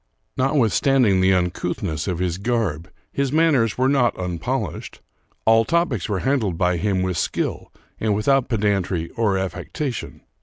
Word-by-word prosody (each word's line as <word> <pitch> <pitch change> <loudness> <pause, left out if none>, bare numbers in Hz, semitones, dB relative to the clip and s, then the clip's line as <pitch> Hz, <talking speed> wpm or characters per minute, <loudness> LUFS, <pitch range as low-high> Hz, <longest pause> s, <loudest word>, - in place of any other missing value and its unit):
Notwith 130 -4 +2
standing 125 -9 +3
the 95 +1 +4
uncouthness 90 -2 -2
of 90 -3 -1
his 90 0 -2
garb, 100 -7 -1 0.2
his 140 -1 0
manners 145 -9 +2
were 130 +1 +2
not 135 -4 +2
unpolished. 90 -3 -4 0.5
All 115 0 +5
topics 165 - 0
were 100 -3 -1
handled 120 -10 0
by 90 0 +1
him 95 +1 0
with 90 -3 -1
skill, - - -2 0.3
and 110 -2 +1
without 135 +5 +2
pedantry 100 -6 0
or 105 -4 0
affectation. 120 - -4
105 Hz, 145 wpm, -22 LUFS, 90-130 Hz, 0.5 s, All